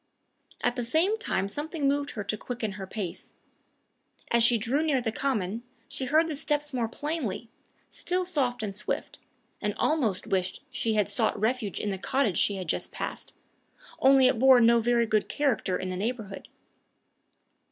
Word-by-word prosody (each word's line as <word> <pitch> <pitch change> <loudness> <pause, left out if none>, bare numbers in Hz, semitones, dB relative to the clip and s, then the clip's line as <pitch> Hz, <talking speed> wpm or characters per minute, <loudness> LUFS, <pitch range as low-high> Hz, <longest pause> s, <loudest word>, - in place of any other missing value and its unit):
At 245 +1 +1
the 245 - -1
same 340 - +2
time 195 - -1
something 295 - -2
moved 285 +1 +1
her 205 - -2
to 200 - -2
quicken 225 -1 -4
her 195 -1 -7
pace. 190 -4 -5 1.0
As 235 - +4
she 235 +1 +5
drew 245 +7 0
near 300 -4 +2
the 235 -2 -2
common, 220 -5 -1 0.3
she 265 - -4
heard 315 +5 +3
the 315 - -3
steps 295 0 -1
more 240 -3 0
plainly, 240 - -4 0.4
still 365 +1 -1
soft 265 -10 -1
and 200 -2 -3
swift, 210 +2 -4 0.4
and 210 -1 -1
almost 245 -12 +1
wished 185 -1 -1
she 225 -1 -1
had 210 -2 +2
sought 210 +1 0
refuge 220 -2 -1
in 210 - -2
the 190 - -4
cottage 240 - +1
she 205 - +2
had 185 -3 -5
just - - -1
passed - - -6 0.6
only 270 0 +6
it 255 -2 +3
bore 260 0 +7
no 235 0 +6
very 235 0 +2
good 215 -1 +1
character 265 -10 0
in 185 - -4
the 185 - -3
neighborhood. 210 -1 -4
235 Hz, 175 wpm, -28 LUFS, 210-275 Hz, 1.0 s, bore